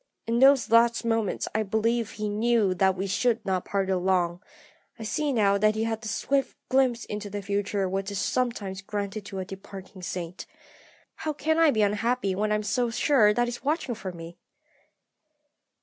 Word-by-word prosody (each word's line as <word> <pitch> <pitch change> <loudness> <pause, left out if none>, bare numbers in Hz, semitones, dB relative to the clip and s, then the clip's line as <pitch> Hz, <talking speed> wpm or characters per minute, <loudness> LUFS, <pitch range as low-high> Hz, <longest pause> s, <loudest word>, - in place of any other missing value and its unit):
In 230 +1 0
those 270 -3 +5
last 235 +1 +4
moments 225 -3 0
I 220 - +1
believe 220 +2 0
he 215 0 -3
knew 215 -1 +2
that 190 +1 +2
we 190 - -2
should 220 +3 0
not 185 -2 -1
be - - -18
parted 195 -1 0
long; 180 -1 0 0.6
I 225 - -7
see 290 +7 -1
now 200 -5 +3
that 215 +1 +3
he 220 - 0
had 225 -1 -2
that 220 - -6
swift 270 +6 -1
glimpse 255 -2 +2
into 210 0 -5
the 205 0 -5
future 200 0 -1
which 195 +1 -2
is 200 - -4
sometimes 205 -5 -1
granted 205 0 -4
to 195 - -7
a 190 - -3
departing 190 0 -10
saint. 180 0 -6 0.7
How 310 - -3
can 315 +2 0
I 325 -1 +6
be 220 -6 +2
unhappy 210 0 0
when 210 +3 -1
I - - +3
am 210 - -2
so 240 +3 0
sure 230 -2 +4
that 240 +3 +1
he 240 - -1
is 240 0 -7
watching 290 -3 -1
for 195 -4 -6
me? 170 0 -10
210 Hz, 195 wpm, -26 LUFS, 195-235 Hz, 0.7 s, I